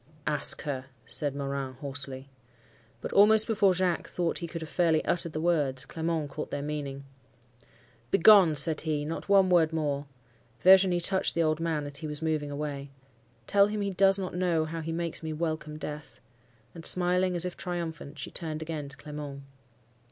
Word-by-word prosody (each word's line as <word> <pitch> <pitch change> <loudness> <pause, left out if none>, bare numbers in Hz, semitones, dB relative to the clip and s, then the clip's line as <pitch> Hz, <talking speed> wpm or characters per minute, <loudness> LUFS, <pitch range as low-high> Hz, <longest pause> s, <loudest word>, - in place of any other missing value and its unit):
"'Ask 150 -2 +2
her!' 135 -3 -4 0.2
said 140 +4 -3
Morin, 140 -1 -4
hoarsely. 135 0 -5 0.7
"But - - -5
almost 215 +2 +6
before 200 -4 +2
Jacques 180 -2 0
thought 170 -2 -2
he 170 - -5
could 165 0 -7
have 155 - -9
fairly 165 -3 +1
uttered 170 -1 +1
the 155 - -3
words, 150 -6 0
Clement 160 -3 -3
caught 150 - -5
their 140 - -4
meaning. 145 -2 -5 1.1
"'Begone!' 190 - +6
said 155 +2 +2
he; 150 -2 -2
'not 165 +5 -5
one 195 -1 +5
word 165 -3 +4
more.' 145 -3 -2 0.5
Virginie 185 -1 +6
touched 190 +2 +2
the 170 - +2
old 155 0 +1
man 160 -3 -1
as 145 0 -3
he 155 - -5
was 150 -1 -5
moving 155 -2 -1
away. 145 -1 -5 0.6
'Tell 200 - +4
him 210 0 -3
he 200 -1 -1
does 195 +1 +4
not 190 -2 -4
know 175 -3 +1
how 165 +1 -5
he 160 +1 -4
makes 170 0 -4
me 160 -1 -4
welcome 155 -1 -3
death.' 150 -1 -8 0.5
And 165 - -10
smiling, 180 +1 +2
as 175 +1 +2
if 180 - -4
triumphant, 165 -4 -5
she 135 - -7
turned 160 -2 -4
again 155 -3 -5
to 140 - -9
Clement. 145 -1 -8
160 Hz, 180 wpm, -28 LUFS, 145-175 Hz, 1.1 s, almost